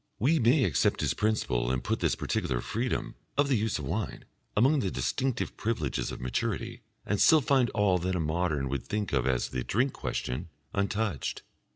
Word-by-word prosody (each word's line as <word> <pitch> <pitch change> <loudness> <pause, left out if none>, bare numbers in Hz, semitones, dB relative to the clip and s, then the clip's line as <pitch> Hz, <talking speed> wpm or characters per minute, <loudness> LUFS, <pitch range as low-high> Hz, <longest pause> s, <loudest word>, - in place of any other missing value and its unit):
We 155 +8 +3
may 125 +5 +4
accept 85 -10 +2
his - - +1
principle 70 - 0
and 65 -1 -1
put - - -1
this - - +1
particular 60 - -1
freedom 120 - -2 0.2
(of 145 0 +3
the 135 - +4
use 110 -1 0
of 75 - -5
wine) 95 +6 -3 0.3
among 135 +7 +5
the 100 - 0
distinctive 130 +6 -1
privileges 85 - -1
of - - -6
maturity, 115 - -2 0.2
and 105 - 0
still 160 - +7
find 130 -3 +3
all 100 -3 +3
that 90 +2 -1
a - - 0
modern 80 -3 0
would 70 -1 -3
think 105 -4 -2
of 65 -2 +2
as 65 -2 +1
the 65 - -3
Drink 125 - +1
Question 75 +8 -3 0.2
untouched. 100 - -1
100 Hz, 185 wpm, -29 LUFS, 75-120 Hz, 0.3 s, still